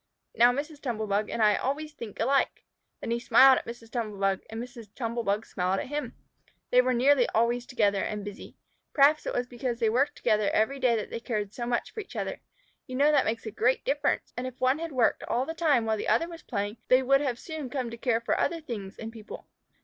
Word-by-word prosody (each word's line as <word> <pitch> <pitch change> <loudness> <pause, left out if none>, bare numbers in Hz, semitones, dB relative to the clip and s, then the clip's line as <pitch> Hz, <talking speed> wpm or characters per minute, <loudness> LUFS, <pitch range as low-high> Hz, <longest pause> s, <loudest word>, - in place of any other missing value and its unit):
Now 240 +2 +6
Mrs. 290 +3 -5
Tumble 230 -6 -2
bug 205 +1 0
and 225 - 0
I 210 -1 +5
always 300 +6 -3
think 220 -7 -9
alike." 270 +4 +1 0.4
Then - - -4
he 235 - 0
smiled 265 +2 +6
at - - -13
Mrs. 230 -1 -9
Tumble 220 -4 -3
bug 195 -1 +1
and 225 - -6
Mrs. 240 -2 -8
Tumble 235 -1 -2
bug 210 0 -1
smiled 185 +1 -1
at - - -4
him. 295 +1 -4 0.6
They 250 - +7
were 255 0 +1
nearly 260 +1 +4
always 240 +2 +1
together 205 -6 +1
and 210 -1 -4
busy. 205 -1 -9 0.4
Perhaps 295 +2 +4
it - - -2
was 245 - 0
because 245 0 -4
they 225 -2 +1
worked 275 +5 +1
together 215 -3 +1
every 270 +6 +1
day 250 -3 +3
that 215 - -4
they - - -4
cared 210 -4 -3
so 240 -1 -4
much 240 -1 -1
for - - -6
each 410 - -8
other. - - -3 0.5
You 255 - -6
know 285 +3 +4
that 300 - +3
makes 230 +1 -2
a 220 - -4
great 250 +5 +1
difference, 285 +1 0
and 250 +1 -3
if 255 0 -9
one 260 +3 +2
had 330 -1 -4
worked 250 -5 +2
all 250 +2 0
the 325 - -4
time 305 -8 +2
while 220 -1 0
the - - -4
other 330 - +2
was 335 -1 -10
playing, 205 -3 -3
they 255 +1 +5
would 275 +2 +4 0.2
soon 315 +3 -7
have 265 - -5
come 255 -4 -3
to - - -6
care 230 -1 0
for 230 - 0
other 335 - 0
things 215 -10 -7
and 225 0 -7
people. 220 -2 -10
240 Hz, 240 wpm, -28 LUFS, 220-275 Hz, 0.6 s, They